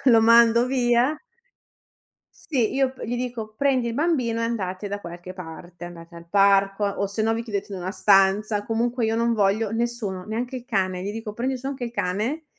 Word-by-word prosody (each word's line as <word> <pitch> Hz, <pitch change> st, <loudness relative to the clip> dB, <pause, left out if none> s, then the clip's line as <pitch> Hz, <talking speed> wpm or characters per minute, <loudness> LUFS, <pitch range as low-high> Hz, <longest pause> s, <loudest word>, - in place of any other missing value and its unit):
Lo 250 Hz, -, +7 dB
lo 225 Hz, -, +7 dB
mando 235 Hz, +1 st, +6 dB
via 250 Hz, +2 st, +2 dB, 1.3 s
Sì, 250 Hz, -7 st, +1 dB
io 265 Hz, -1 st, +1 dB
p -, -, -12 dB
gli 240 Hz, +2 st, -2 dB
dico: 235 Hz, -3 st, -5 dB
"Prendi 265 Hz, -4 st, +2 dB
il 230 Hz, -, -3 dB
bambino 250 Hz, -6 st, 0 dB
e -, -, 0 dB
andate 205 Hz, -4 st, -3 dB
da 205 Hz, +1 st, -4 dB
qualche 175 Hz, +1 st, -9 dB
parte, 175 Hz, 0 st, -10 dB
andate 170 Hz, -1 st, -11 dB
al 170 Hz, 0 st, -12 dB
parco 195 Hz, 0 st, +3 dB
o 200 Hz, 0 st, -1 dB
se 200 Hz, +3 st, -5 dB
no 225 Hz, +1 st, +2 dB
vi 230 Hz, -, -3 dB
chiudete 205 Hz, -2 st, -4 dB
in 190 Hz, -, -5 dB
una 180 Hz, +1 st, -4 dB
stanza." 205 Hz, +1 st, +3 dB
Comunque 235 Hz, +2 st, -1 dB
io 225 Hz, 0 st, 0 dB
non 235 Hz, 0 st, +1 dB
voglio 205 Hz, +1 st, +1 dB
nessuno, 225 Hz, -5 st, -3 dB
neanche 240 Hz, +5 st, -4 dB
il 245 Hz, -, -8 dB
cane. 185 Hz, -5 st, -1 dB
Gli 200 Hz, +2 st, -4 dB
dico: 220 Hz, -1 st, -6 dB
"Prendi 255 Hz, +3 st, -2 dB
su 260 Hz, -, -8 dB
anche 270 Hz, -2 st, -4 dB
il 235 Hz, -, -5 dB
cane, 230 Hz, -, -2 dB
225 Hz, 205 wpm, -24 LUFS, 195-240 Hz, 1.3 s, Lo